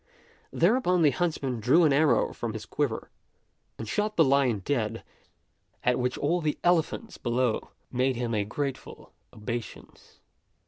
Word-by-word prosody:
Thereupon 180 -2 +2
the 145 - +5
huntsman 135 -4 -2
drew 135 +10 +4
an 150 -3 +4
arrow 150 +2 +3
from 115 -2 -4
his 110 - -6
quiver 140 -7 -2 0.7
and 110 - -6
shot 210 - -1
the 165 - +6
lion 135 -7 +2
dead, 115 -5 -1 0.8
at 125 0 +2
which 125 +1 -1
all 170 +4 0
the 150 -2 -1
elephants 175 +6 0
below 120 -1 0 0.2
made 130 +1 +1
him 120 -1 -2
a 105 -2 +1
grateful 135 +6 -5 0.2
obeisance. 115 0 -8
135 Hz, 140 wpm, -27 LUFS, 120-160 Hz, 0.8 s, the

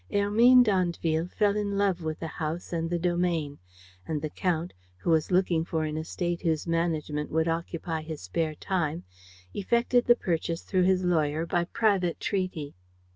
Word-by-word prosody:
Hermine 230 +5 +6
d'Andeville 175 -5 0
fell 205 +2 +1
in 200 -1 -1
love 195 -3 +1
with 155 -1 -3
the - - -4
house 160 +2 -4
and 165 -1 -1
the 175 - 0
domain; 175 -4 -1 0.5
and 155 -2 -1
the 150 0 -4
Count, 175 -2 -1 0.2
who 170 - -1
was 160 -2 +2
looking 180 -3 +2
for 160 -1 -2
an 155 0 -3
estate 170 +2 -3
whose 160 -3 0
management 160 -3 -1
would 160 +1 +1
occupy 165 0 -2
his 155 -1 -6
spare 155 - -2
time 165 -2 -2 0.5
effected 235 +4 +2
the 240 - +6
purchase 170 -5 -2
through 185 -2 +1
his 185 0 +2
lawyer 160 -2 +1
by 170 +1 0
private 195 -4 +1
treaty. 185 -7 -2
170 Hz, 165 wpm, -27 LUFS, 160-185 Hz, 0.5 s, Hermine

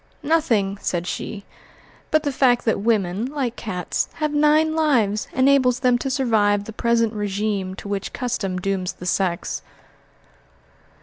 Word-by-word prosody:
"Nothing," 235 -11 +1
said 175 -1 -2
she, 200 +2 -5 0.6
"but 310 -1 +2
the 290 - 0
fact 255 -2 +2
that 225 - +1
women, 205 -1 0
like 265 -4 -3
cats, 180 -5 -3
have 305 -1 -2
nine 305 +2 +3
lives, 235 -10 +2
enables 260 -1 +3
them 250 -2 +3
to 270 - -2
survive 220 -6 +2
the 220 - -9
present 230 0 +1
régime 205 -2 -2
to 200 - -9
which 200 -1 -3
custom 220 -7 -2
dooms 185 -1 -2
the 180 - -10
sex." 180 -1 -1
225 Hz, 140 wpm, -22 LUFS, 200-265 Hz, 0.6 s, nine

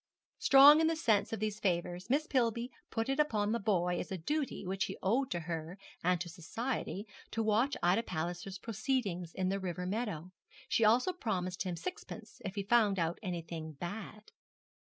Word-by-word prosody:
Strong 285 +3 +8
in 320 - +4
the 325 - +2
sense 220 -10 +2
of 225 - -2
these 215 0 -2
favours, 175 +1 -1
Miss 290 +4 +2
Pillby 240 -3 0 0.2
put 225 0 -1
it 270 +2 -1
upon 215 -8 +2
the 235 - +1
boy 180 -4 +1
as - - -5
a 190 - -2
duty 285 - -2
which 190 +1 -1
he - - -6
owed 245 +7 +2
to 175 - -2
her 165 +2 -5 0.3
and 180 0 +3
to 175 - -4
society 200 +5 -4 0.2
to 225 - -1
watch 225 +6 +2
Ida 180 +5 +4
Palliser's 175 0 -4
proceedings 205 -6 -2
in 185 -1 0
the 195 +1 0
river 180 -1 -3
meadow. 185 -4 -3 0.4
She 230 - +2
also 245 +11 +4
promised 185 - -2
him 180 -2 -2
sixpence 265 - -7
if 195 0 -5
he 200 - -2
found 210 -2 +3
out 170 -1 -1
anything 165 -4 -5
bad. 205 +7 -7
200 Hz, 180 wpm, -33 LUFS, 180-235 Hz, 0.4 s, Strong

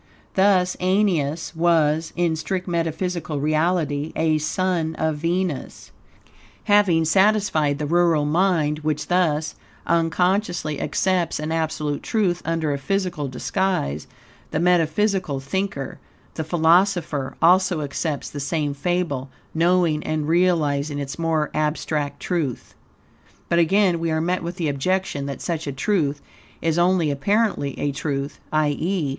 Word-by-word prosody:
Thus 190 -2 +3
Aeneas 180 -5 0
was, 160 -1 +2
in 175 -2 +1
strict 185 +3 -3
metaphysical 170 -2 -2
reality, 155 0 0
a 160 -1 +2
son 165 0 -1
of 160 -1 -1
Venus. 170 -1 -3 0.7
Having 195 -6 +4
satisfied 190 -5 +2
the 150 - -3
rural 165 -1 +3
mind, 155 -2 +1
which 155 -1 -2
thus, 160 -4 +1 0.3
unconsciously, 175 -1 0
accepts 180 -4 0
an 155 +1 -3
absolute 155 -2 -1
truth 185 -6 0
under 160 -2 0
a 140 - -3
physical 180 -1 -2
disguise, 130 - -2 0.4
the 150 - -1
metaphysical 180 -1 +1
thinker, 140 -1 -3 0.3
the 160 - -3
philosopher, 165 -3 +2
also 180 -1 +4
accepts 145 0 -3
the 145 - -6
same 145 0 -1
fable, 145 -3 -2 0.2
knowing 170 -2 +2
and 155 -1 -2
realizing 155 -4 +1
its 140 +1 -5
more 160 -2 0
abstract 150 -1 -1
truth, 160 -9 -3 0.8
But, 170 - +3
again, 180 +1 +3
we 165 0 -1
are 160 0 0
met 180 +3 0
with 170 +1 -5
the 170 -4 -2
objection 145 0 -1
that 140 - -6
such 165 -3 -3
a - - -1
truth 145 0 -1 0.4
is 165 0 0
only 175 -3 +3
apparently 200 - 0
a 145 - 0
truth; 140 0 -3
i.e. 155 +2 0
165 Hz, 125 wpm, -22 LUFS, 150-180 Hz, 0.8 s, Having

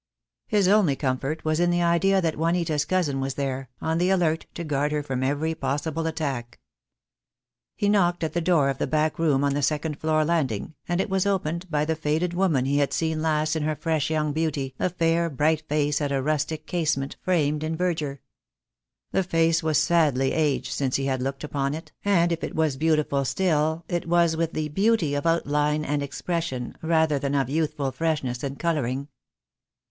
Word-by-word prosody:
His 205 -3 +2
only 195 -8 +4
comfort 135 +4 -2
was 155 0 +1
in 175 0 +3
the 175 0 +2
idea 180 +3 +3
that 165 -3 0
Juanita's 165 -2 0
cousin 155 -6 0
was 135 0 -2
there, 135 -2 -3
on 160 +1 0
the 180 +1 +2
alert 170 -4 +1
to 170 - -4
guard 145 -1 0
her 150 -1 -1
from 130 -3 -3
every 145 +4 0
possible 155 +3 -2
attack. 140 -7 -4 1.2
He 205 - 0
knocked 175 -4 +2
at 160 - -2
the 175 - 0
door 160 -5 +3
of 135 - -3
the - - 0
back 155 0 0
room 145 -4 +2
on 140 -1 +2
the 145 - -1
second 150 +1 -1
floor 155 -1 +2
landing, 150 -7 -1
and 175 0 0
it - - +1
was 190 0 0
opened 175 -2 -1
by 150 -2 +1
the 160 +1 0
faded 160 +3 -1
woman 175 -8 +2
he 140 +2 +1
had 140 - +1
seen 160 -1 -1
last 155 0 +1
in 160 - -1
her 155 +1 0
fresh 155 -2 -1
young 155 -2 0
beauty, 145 -4 -1
a - - +1
fair, 170 -1 +1
bright 155 +2 0
face 150 0 +1
at 145 -1 -1
a 135 - +1
rustic 155 +2 -1
casement, 155 -6 -1
framed 150 -4 +1
in 160 +1 -2
verdure. 155 -6 -2 0.9
The - - +2
face 165 -2 +2
was 160 -2 +1
sadly 145 -6 +2
aged 150 -4 0
since 135 -2 -1
he 135 - 0
had 130 -2 -1
looked 135 +2 -3
upon 140 -1 -2
it, 160 -1 -9
and 175 -4 +3
if 165 - -2
it - - -4
was 155 -3 +1
beautiful 150 -2 +1
still 160 +1 0
it 175 -1 -2
was 170 -1 +3
with 165 0 -1
the 155 -1 -2
beauty 195 -2 +2
of 145 +3 -1
outline 150 -2 +1
and 145 -1 -1
expression, 140 -2 -3
rather 160 -3 +2
than 140 +1 -1
of 135 -2 0
youthful 150 -3 -1
freshness 145 -6 -1
and 140 -1 -4
colouring. 140 -5 -1
155 Hz, 195 wpm, -25 LUFS, 140-165 Hz, 1.2 s, only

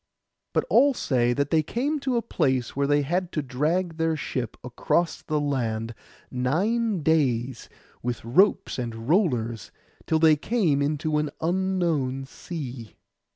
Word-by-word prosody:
But - - +1
all 280 - +4
say 120 - +1
that 140 +3 -1
they 160 -1 +4
came 275 - -1
to 265 -3 0
a 230 - 0
place 130 - 0
where 140 0 +1
they 145 0 +3
had 175 +5 -1
to 150 - -1
drag 160 +6 -1
their 160 -1 +1
ship 125 -5 -4
across 160 +7 0
the 155 -1 -1
land 115 -6 -1 0.4
nine 190 - 0
days 130 -6 +1 0.3
with 120 -1 -4
ropes 185 - +2
and 115 -2 -5
rollers, 125 - +1 0.4
till 160 - +3
they 160 -1 +6
came 165 -6 +1
into 150 +1 0
an 150 -1 -1
unknown 165 -7 0
sea. 130 -7 -7
150 Hz, 145 wpm, -25 LUFS, 125-175 Hz, 0.4 s, they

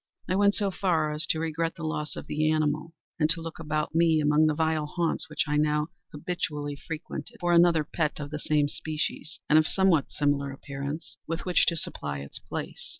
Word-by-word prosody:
I 185 - +1
went 200 +1 +4
so 200 -2 +2
far 165 -5 +1
as 150 +2 0
to - - +1
regret 165 +1 -1
the 165 - -8
loss 155 -1 -2
of - - -6
the 155 +1 +1
animal, 155 +1 0 0.2
and 155 -1 +3
to 165 +1 +1
look 165 0 -7
about 155 -1 -2
me, 165 -1 +4
among 150 +1 +4
the 155 - +1
vile 160 -1 +1
haunts 170 +1 -1
which 150 - 0
I 150 0 +1
now 150 +1 +2 0.2
habitually 150 -2 -3
frequented, 165 +10 -7
for 175 -1 +2
another 170 -2 +5
pet 155 0 -1
of 145 0 -5
the 150 - -3
same 150 -1 +2
species, 155 +1 -4
and 155 - +6
of 155 - +2
somewhat 190 -7 +3
similar 145 -1 +1
appearance, 140 +3 -6
with 165 +1 -3
which 180 -1 +3
to 170 - +3
supply 75 - -3
its 70 - -8
place. - - -6
155 Hz, 205 wpm, -28 LUFS, 150-165 Hz, 0.2 s, and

